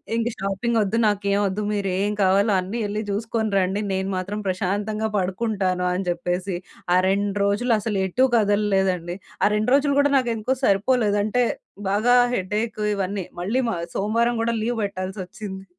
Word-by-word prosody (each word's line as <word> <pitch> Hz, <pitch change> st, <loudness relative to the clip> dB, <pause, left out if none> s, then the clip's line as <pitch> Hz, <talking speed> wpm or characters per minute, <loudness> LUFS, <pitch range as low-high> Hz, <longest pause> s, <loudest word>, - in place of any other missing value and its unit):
ఇంక 230 Hz, 0 st, 0 dB
షాపింగ్ 195 Hz, +4 st, -1 dB
ఒద్దు, 210 Hz, +2 st, 0 dB
నాకేం 200 Hz, -1 st, +1 dB
ఒద్దు. 195 Hz, +2 st, -2 dB
మీరేం 200 Hz, 0 st, 0 dB
కావాలో 195 Hz, +3 st, +3 dB
అన్నీ 190 Hz, +5 st, -4 dB
యెళ్లి 210 Hz, +1 st, -2 dB
జూసుకొని 220 Hz, +1 st, -1 dB
రండి. 190 Hz, +2 st, +1 dB
నేను 190 Hz, 0 st, -1 dB
మాత్రం 195 Hz, +3 st, -3 dB
ప్రశాంతంగా 205 Hz, +4 st, -1 dB
పడుకుంటాను. 190 Hz, -1 st, -1 dB
అని 185 Hz, +1 st, -2 dB
చెప్పేసి 175 Hz, +2 st, -2 dB, 0.4 s
ఆ -, -, +6 dB
2 200 Hz, +1 st, 0 dB
రోజులు 210 Hz, +5 st, +1 dB
అసలు 210 Hz, -1 st, -2 dB
ఎటూ 250 Hz, +8 st, +2 dB
గదలలేదండి. 195 Hz, -5 st, +1 dB, 0.3 s
ఆ -, -, +6 dB
2 215 Hz, +2 st, 0 dB
రోజులు 280 Hz, 0 st, +2 dB
గూడా 285 Hz, 0 st, +3 dB
నాకేందుకో 240 Hz, 0 st, 0 dB
సరిపోలేదు. 205 Hz, 0 st, +2 dB
అంటే 230 Hz, +4 st, +1 dB, 0.5 s
బాగా 220 Hz, +5 st, +3 dB, 0.2 s
హెడేక్ 215 Hz, +2 st, -2 dB
ఇవన్నీ 195 Hz, -1 st, -2 dB, 0.2 s
మళ్ళీ 220 Hz, +9 st, 0 dB
మ -, -, 0 dB, 0.2 s
సోమవారం 230 Hz, +4 st, +1 dB
గూడా 230 Hz, 0 st, 0 dB
లీవ్ 240 Hz, +1 st, -1 dB
పెట్టాల్సొచ్చింది. 190 Hz, 0 st, -5 dB
205 Hz, 150 wpm, -23 LUFS, 190-225 Hz, 0.5 s, ఆ